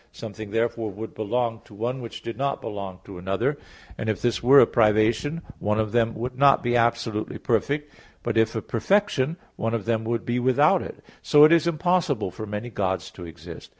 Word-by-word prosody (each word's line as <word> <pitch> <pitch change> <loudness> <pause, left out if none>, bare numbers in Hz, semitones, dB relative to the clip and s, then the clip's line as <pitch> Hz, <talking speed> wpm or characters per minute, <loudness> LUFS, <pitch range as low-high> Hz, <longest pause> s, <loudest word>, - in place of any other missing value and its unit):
Something 110 -1 -8
therefore 115 0 -1
would 110 +3 -8
belong 115 +1 -2
to 105 - -15
one 120 +5 -3
which 115 - -8
did 115 - -5
not 140 +3 -1
belong 100 -3 -6
to 95 -3 -10
another. 95 +1 -1 0.4
And 110 - -2
if 110 - -1
this 115 -6 0
were 135 +4 +7
a - - +8
privation, 115 +8 +2 0.2
one 105 +1 0
of 110 -1 -1
them 115 -1 +1
would 125 +3 -4
not 140 +1 +4
be 120 0 +1
absolutely 115 -2 0
perfect; 145 +6 -1 0.3
but - - -2
if 110 0 +2
a 110 - -3
perfection, 165 - +1 0.2
one 115 +1 -1
of 110 - -4
them 115 -1 0
would 115 0 -2
be 120 +1 0
without 145 +8 +3
it. - - -9 0.2
So 150 -1 +6
it 155 - +8
is 170 -1 +4
impossible 170 - 0
for 110 +4 -7
many 105 +4 -5
gods 95 -3 -2
to 90 - -10
exist. 80 - -11
115 Hz, 200 wpm, -24 LUFS, 110-130 Hz, 0.4 s, a